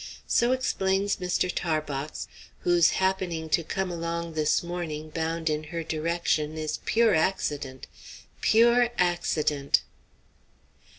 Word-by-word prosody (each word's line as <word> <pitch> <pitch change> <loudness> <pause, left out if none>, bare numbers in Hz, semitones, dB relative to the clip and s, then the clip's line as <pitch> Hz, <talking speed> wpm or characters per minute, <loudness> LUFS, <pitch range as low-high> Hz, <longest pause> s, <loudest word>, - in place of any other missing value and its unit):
So 240 +1 +2
explains 200 -6 +1
Mr. 180 0 0
Tarbox, 155 -3 -3 0.3
whose 175 -2 +4
happening 185 -4 -1
to 170 - +2
come 190 +3 -2
along 170 0 -3
this 155 +1 +1
morning 160 -3 -5
bound 165 +1 -2
in 155 0 0
her 165 +2 -4
direction 160 -1 -1
is 155 -1 -3
pure 230 -2 +3
accident 145 -6 -1 0.6
pure 235 +1 +5
accident. 155 -5 +1
170 Hz, 110 wpm, -27 LUFS, 155-185 Hz, 0.6 s, pure